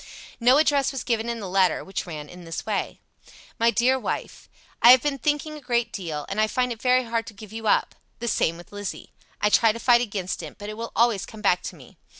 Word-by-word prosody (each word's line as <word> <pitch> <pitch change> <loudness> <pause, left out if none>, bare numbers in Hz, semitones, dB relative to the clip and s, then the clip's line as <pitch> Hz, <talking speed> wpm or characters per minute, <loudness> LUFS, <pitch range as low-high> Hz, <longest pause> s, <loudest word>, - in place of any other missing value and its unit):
No 250 +3 +5
address 285 -3 +3
was 270 - -5
given 230 -1 -1
in 235 -1 -3
the 200 - -5
letter, 185 0 +2
which 190 -1 -5
ran 150 -3 -7
in 180 +3 -12
this 165 -1 -6
way: - - -2 0.6
MY 230 +1 +4
DEAR 255 +3 +2
WIFE, - - -5 0.3
"I 235 - +8
have 255 0 +9
been 285 -2 -1
thinking 295 +1 -1
a 300 - -10
great 240 -3 -1
deal, 160 -6 -4
and 205 +2 -1
I 215 - +3
find 250 +2 0
it 230 -1 -6
very 255 0 +3
hard 230 -1 -2
to 220 - -10
give 210 +1 -12
you 225 -1 -5
up. - - +2 0.2
The 235 - -5
same 165 -6 +1
with 175 - -14
Lizzie. 205 -2 -7 0.3
I 210 - +2
try 225 +1 +5
to 220 - -6
fight 240 0 +5
against 200 -6 -3
it, - - -9
but 205 0 -7
it - - -5
will 230 +1 -6
always 230 -4 +2
come 220 0 -11
back 180 -3 +3
to - - -7
me. - - -16
225 Hz, 245 wpm, -24 LUFS, 195-245 Hz, 0.6 s, have